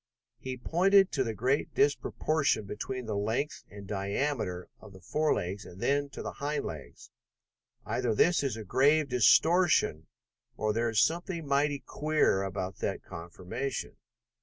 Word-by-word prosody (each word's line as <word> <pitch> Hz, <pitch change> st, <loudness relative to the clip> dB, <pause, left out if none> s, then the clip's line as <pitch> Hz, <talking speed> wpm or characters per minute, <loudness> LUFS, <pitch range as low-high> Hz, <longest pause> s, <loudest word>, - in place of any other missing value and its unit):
He 130 Hz, -1 st, -5 dB
pointed 190 Hz, +8 st, +4 dB
to 135 Hz, -, +1 dB
the 115 Hz, -3 st, -3 dB
great 130 Hz, +6 st, 0 dB
disproportion 145 Hz, -3 st, +1 dB
between 125 Hz, +5 st, -5 dB
the 110 Hz, -2 st, -3 dB
length 110 Hz, +8 st, -2 dB
and 100 Hz, 0 st, -10 dB
diameter 100 Hz, -1 st, -2 dB
of 105 Hz, -2 st, -14 dB
the 95 Hz, -, -13 dB
forelegs, 100 Hz, -, -1 dB
and 90 Hz, -, -12 dB
then 140 Hz, +3 st, +1 dB
to -, -, -8 dB
the -, -, -4 dB
hind 145 Hz, +1 st, -3 dB
legs. 75 Hz, -4 st, -9 dB, 0.7 s
"Either 120 Hz, -3 st, -1 dB
this 175 Hz, +10 st, +4 dB
is 135 Hz, -5 st, -2 dB
grave 140 Hz, +7 st, +3 dB
distortion 130 Hz, -, +4 dB, 0.5 s
or 110 Hz, 0 st, 0 dB
there 115 Hz, +1 st, 0 dB
is 110 Hz, -1 st, +4 dB
something 170 Hz, 0 st, -2 dB
mighty 140 Hz, 0 st, +1 dB
queer 155 Hz, -10 st, +1 dB
about 95 Hz, -1 st, -4 dB
that -, -, -3 dB
conformation. 90 Hz, +10 st, -5 dB
130 Hz, 140 wpm, -30 LUFS, 100-150 Hz, 0.7 s, pointed